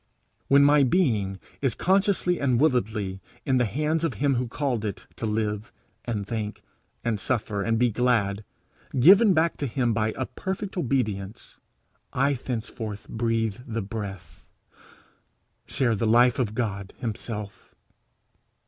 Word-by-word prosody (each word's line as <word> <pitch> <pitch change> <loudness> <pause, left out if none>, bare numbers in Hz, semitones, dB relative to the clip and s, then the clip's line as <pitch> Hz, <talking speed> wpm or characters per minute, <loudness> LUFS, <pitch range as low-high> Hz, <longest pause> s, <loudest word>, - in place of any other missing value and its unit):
When 140 +1 +6
my 145 +1 +6
being 110 - +1 0.2
is 135 -5 +1
consciously 190 -1 +2
and 130 -4 +2
willedly 110 -9 0 0.2
in 130 -1 +2
the 125 - +3
hands 150 +8 0
of 155 -8 0
him 140 +4 +2
who 125 0 -1
called 125 -2 -2
it 100 -3 -4
to 115 - -2
live 105 0 -2 0.3
and 105 -4 -2
think 105 -1 -4 0.4
and 115 -3 0
suffer 105 -3 -1
and 115 +3 +1
be 120 0 +3
glad 110 -3 +1 0.6
given 195 - +7
back 160 +1 +2
to 140 - -2
him 120 -1 0
by 110 0 +1
a 130 - -1
perfect 190 +6 -5
obedience 115 - -2 0.6
I 135 +2 +2
thenceforward 115 -4 -5
breathe 115 -2 0
the 115 -2 -3
breath, 95 -6 -7 1.2
share 125 -4 +1
the 110 +1 0
life 120 +4 +5
of 110 -4 -1
God 100 -5 -3
himself. 105 -3 -6
115 Hz, 140 wpm, -26 LUFS, 105-135 Hz, 1.2 s, given